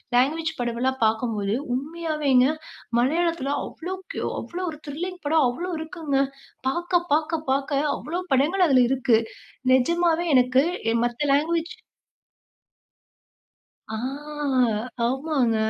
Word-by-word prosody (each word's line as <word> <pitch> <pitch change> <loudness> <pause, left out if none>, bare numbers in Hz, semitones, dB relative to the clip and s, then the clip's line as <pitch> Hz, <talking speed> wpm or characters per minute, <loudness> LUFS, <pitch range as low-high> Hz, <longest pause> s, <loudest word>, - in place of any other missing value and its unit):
Language 315 +6 +2
படம்லாம் 245 +2 -1
பார்க்கும்போது, 220 -2 0 0.2
உண்மையாவேங்க, 295 -3 +1 0.5
மலையாளத்தில 315 +1 +1
அவ்ளோக்கு, 375 +6 -6 0.2
அவ்ளோ 360 +2 -6
ஒரு 305 - -10
த்ரில்லிங் 355 +5 -5
படம் 305 -1 +4
அவ்ளோ 350 +9 -4
இருக்குங்க. 320 -3 -2 0.5
பார்க்க, 345 +4 0
பார்க்க, 315 +1 +1
பார்க்க 275 +1 +1 0.2
அவ்ளோ 340 +4 -4
படங்கள் 325 +8 +3
அதில 255 -2 +6
இருக்கு. 250 -3 +3 0.6
நிஜமாவே 340 +6 +2
எனக்கு 255 +1 +4 0.3
எ - - +1
மத்த 240 +5 -1
லாங்குவேஜ் 330 +3 +1 2.2
ஆ - - -1 1.1
ஆமாங்க. 265 -2 +1
295 Hz, 100 wpm, -24 LUFS, 255-335 Hz, 2.2 s, அதில